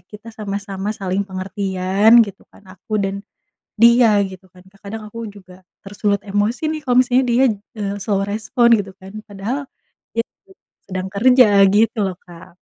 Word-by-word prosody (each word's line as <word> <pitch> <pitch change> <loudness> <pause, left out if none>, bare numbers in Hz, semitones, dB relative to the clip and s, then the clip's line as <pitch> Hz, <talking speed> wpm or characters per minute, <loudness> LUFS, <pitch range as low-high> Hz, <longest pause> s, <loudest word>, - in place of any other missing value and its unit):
kita 215 +2 -12
sama-sama 200 -1 -5
saling 195 +1 -3
pengertian 195 +3 +2
gitu 200 -2 -13
kan, 200 - -21
aku 200 +3 -5
dan 195 +1 -3 0.6
dia 235 -2 +6
gitu 190 0 -13
kan. 180 -1 -18
Terkadang 200 +2 -9
aku 230 +2 -8
juga 185 -2 -16 0.2
tersulut 200 0 -1
emosi 205 +9 -1
nih 310 -1 -5
kalau 250 -3 +1
misalnya 255 +1 +3
dia, 250 +3 +3 0.4
eee, 200 0 -3
slow 200 -1 0
response 220 +3 +2
gitu 195 - -12
kan. 190 0 -12
Padahal 215 +8 -5 0.5
dia 230 0 -1
itu 385 - -28 0.4
sedang 185 -1 -4
kerja 250 +4 +5 0.2
gitu 220 +2 +2
loh 185 -2 -3
Kak. 170 0 -14
205 Hz, 155 wpm, -19 LUFS, 195-230 Hz, 0.6 s, dia